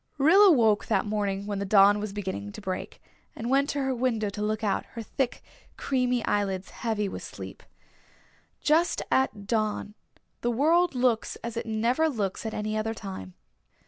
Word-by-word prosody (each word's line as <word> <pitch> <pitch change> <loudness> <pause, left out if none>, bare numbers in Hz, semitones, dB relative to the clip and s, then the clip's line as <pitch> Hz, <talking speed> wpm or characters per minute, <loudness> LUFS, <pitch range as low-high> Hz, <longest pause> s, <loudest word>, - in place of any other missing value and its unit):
Rilla 370 +9 +7
woke 225 -8 +3
that 215 -3 +1
morning 200 -2 -1
when 205 -1 -3
the - - -1
dawn 200 +1 +5
was 210 -1 -4
beginning 190 - -4
to - - -8
break 190 -3 -5 0.4
and 235 +2 -4
went 275 +1 +3
to 285 - -1
her 265 0 0
window 230 -4 0
to 205 - -6
look 215 +1 -1
out, 200 -2 0
her 230 - -4
thick 255 +2 -2 0.3
creamy 250 -3 0
eyelids 195 -2 -1
heavy 220 -3 -2
with - - -6
sleep. - - -9 1.0
Just 320 +3 +2
at 220 -6 +1
dawn 215 -1 -1 0.5
the 240 - 0
world 320 +7 +3
looks 245 -3 +1
as 235 0 -5
it 230 - -4
never 235 +8 +1
looks 210 -5 -3
at 220 - -4
any 215 0 -2
other 220 +1 -1
time. 190 - -8
220 Hz, 175 wpm, -27 LUFS, 205-250 Hz, 1.0 s, Rilla